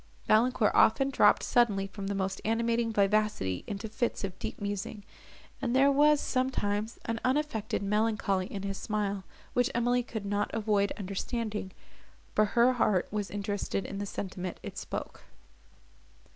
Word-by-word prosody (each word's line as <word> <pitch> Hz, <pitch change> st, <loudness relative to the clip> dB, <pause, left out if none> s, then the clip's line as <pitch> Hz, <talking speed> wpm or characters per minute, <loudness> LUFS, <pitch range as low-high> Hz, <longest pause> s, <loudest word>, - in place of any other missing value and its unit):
Valancourt 220 Hz, 0 st, +3 dB
often 270 Hz, +5 st, +4 dB
dropped 205 Hz, -6 st, +5 dB
suddenly 210 Hz, -5 st, +2 dB
from 195 Hz, 0 st, -6 dB
the 200 Hz, -, -1 dB
most 195 Hz, 0 st, -2 dB
animating 230 Hz, +1 st, +1 dB
vivacity 200 Hz, -, +1 dB
into 205 Hz, +2 st, -4 dB
fits 230 Hz, +1 st, -2 dB
of 185 Hz, -1 st, -5 dB
deep -, -, -5 dB
musing, 205 Hz, +1 st, -4 dB, 0.6 s
and 240 Hz, -, 0 dB
there 275 Hz, +1 st, +6 dB
was, 295 Hz, +1 st, +5 dB
sometimes, 225 Hz, -6 st, -1 dB
an 230 Hz, 0 st, -2 dB
unaffected 255 Hz, -7 st, 0 dB
melancholy 205 Hz, -2 st, +1 dB
in 195 Hz, -1 st, -6 dB
his 195 Hz, -1 st, -3 dB
smile, 205 Hz, -3 st, -2 dB, 0.3 s
which 245 Hz, +2 st, +2 dB
Emily 245 Hz, +1 st, +2 dB
could 220 Hz, -4 st, -6 dB
not 205 Hz, +1 st, 0 dB
avoid 205 Hz, -2 st, +1 dB
understanding, 210 Hz, +1 st, -3 dB, 0.6 s
for 215 Hz, -, +4 dB
her 240 Hz, +4 st, +4 dB
heart 210 Hz, -6 st, +2 dB
was 205 Hz, -1 st, -2 dB
interested 200 Hz, -1 st, -2 dB
in 195 Hz, -, -5 dB
the 205 Hz, -, -3 dB
sentiment 185 Hz, -2 st, -5 dB
it -, -, -7 dB
spoke. -, -, -6 dB
210 Hz, 145 wpm, -30 LUFS, 200-235 Hz, 0.6 s, there